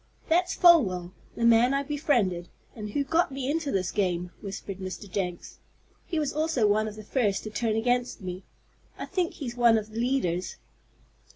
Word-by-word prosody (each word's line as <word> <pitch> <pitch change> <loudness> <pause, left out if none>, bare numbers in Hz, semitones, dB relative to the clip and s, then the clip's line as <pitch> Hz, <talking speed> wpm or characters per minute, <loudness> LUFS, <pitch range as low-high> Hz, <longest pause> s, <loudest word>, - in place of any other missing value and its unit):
"That's 360 +3 +2
Folwell 195 - +5 0.2
the 235 - 0
man 235 +3 +5
I 280 - 0
befriended, 245 - 0 0.3
and 210 -2 -6
who 280 +7 0
got 325 +3 +1
me 270 0 -2
into 315 -2 -1
this 185 -2 0
game," 180 -3 -1
whispered 195 -1 -6
Mr. 190 +1 -6
Jenks. 180 -2 -4 0.5
"He 335 - -2
was 300 -3 0
also 310 -6 +1
one 215 +1 +2
of 210 - -6
the 215 - -9
first 210 -3 0
to 215 - -6
turn 220 0 0
against 245 +2 0
me. 185 -1 -6 0.5
I - - -5
think 365 -3 -1
he's 245 -5 -6
one 235 -2 +5
of 215 0 -4
the 220 - -5
leaders." 230 -9 0
225 Hz, 180 wpm, -27 LUFS, 195-275 Hz, 0.5 s, Folwell